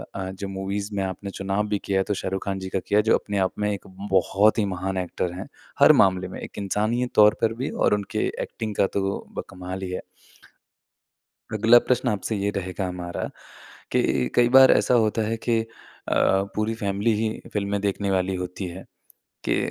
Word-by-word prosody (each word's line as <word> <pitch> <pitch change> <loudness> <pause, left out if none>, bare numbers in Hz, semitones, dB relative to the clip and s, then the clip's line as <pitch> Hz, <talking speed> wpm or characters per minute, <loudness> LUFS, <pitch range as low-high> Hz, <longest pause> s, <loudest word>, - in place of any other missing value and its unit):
अ, 95 -1 -4
जो 95 +1 -6
मूवीज़ 95 +1 -3
में 100 - 0
आपने 95 +1 -5
चुनाव 100 +2 -1
भी 105 -1 -1
किया 95 -1 +2
तो - - +2
शाहरुख 95 +1 -3
खान 100 -1 -2
जी 95 0 -6
का 95 - -1
किया, 105 +1 +4
जो 110 +1 +3
अपने 100 -1 -4
आप - - -16
में 105 0 +1
एक 100 - -6 0.2
बहुत 100 +4 +3
ही 105 - +2
महान 95 0 -3
एक्टर 90 -1 -2
हैं। 95 +2 -7 0.3
हर - - +9
मामले 95 -1 +1
में, 95 - -8
एक - - -9
इंसानियत 110 +5 -1
तौर 105 0 +7
पर 115 0 +2
भी 125 +5 -3
और - - +1
उनके 100 -1 -1 0.2
एक्टिंग 110 -2 -5
का - - +5
तो 100 0 -1 0.2
ब - - 0
कमाल 95 0 -7
ही 95 - -4
है। 90 - -3 1.5
अगला 110 +3 +6
प्रश्न 125 +1 0
आपसे 105 0 -2
ये 100 0 0
रहेगा 95 -1 -3
हमारा, 90 -1 -4 0.6
कि 65 -2 +1
कई 120 0 +5
बार 130 +1 +8
ऐसा - - +3
होता 110 +1 +1
है 115 - 0
कि, 115 0 +1
अ, - - -6 0.9
पूरी 110 +1 0
फैमिली 100 +1 0
ही 110 +1 0 0.2
फ़िल्में 100 0 -1
देखने 100 0 -1
वाली 95 0 0
होती 90 +1 -5
है। 90 +2 -8 0.6
कि - - +1
100 Hz, 195 wpm, -24 LUFS, 95-105 Hz, 1.5 s, हर